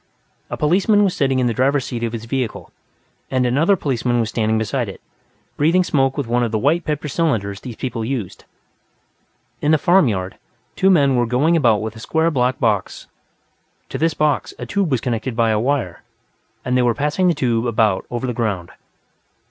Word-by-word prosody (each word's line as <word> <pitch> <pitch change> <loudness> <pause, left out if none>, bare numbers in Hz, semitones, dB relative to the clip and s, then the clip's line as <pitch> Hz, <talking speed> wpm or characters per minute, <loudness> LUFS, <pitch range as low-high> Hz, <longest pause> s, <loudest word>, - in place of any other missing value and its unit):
A - - -4
policeman 195 +7 +3
was 190 -3 +1
sitting 135 -2 +1
in 130 - +1
the 120 - +1
driver's 135 +2 +1
seat 120 -2 -5
of 115 - -1
this 115 -1 -6
vehicle, 125 -2 -4 0.6
and 130 -1 +1
another 150 +11 +3
policeman 125 -6 -1
was 115 -1 0
standing 110 -1 0
beside 110 +1 -2
it, 95 - -9 0.6
breathing 170 +5 +3
smoke 135 -5 +1
with 140 - -1
one 120 +1 0
of 120 -2 -1
the 110 - 0
white 155 +9 +1
paper 150 0 -2
cylinders 115 - -1
these 120 -3 -8
people 115 -2 -4
used. 115 -6 -5 1.2
In 150 - +1
the 155 - +5
farm 175 +1 +4
yard, 95 -4 -3 0.4
two 190 - +3
men 140 -7 +4
were 120 -1 +1
going 140 +8 +2
about 115 -9 +3
with 110 0 -5
a - - -10
square 160 +7 0
black 130 -2 0
box; 105 -6 -1 0.8
to 135 - -5
this 165 0 +1
box, 150 -2 0
a - - -6
tube 200 -4 -1
was 130 -5 0
connected 120 0 -3
by 115 -1 +2
a 105 - +1
wire, 125 -6 -1 0.6
and 125 - 0
they 125 - +3
were 120 -2 +2
passing 150 +6 0
the 175 - +2
tube 120 -3 0
about 110 -4 +1
over 120 +1 -3
the 125 - -2
ground. 105 -7 -2
125 Hz, 195 wpm, -20 LUFS, 115-150 Hz, 1.2 s, the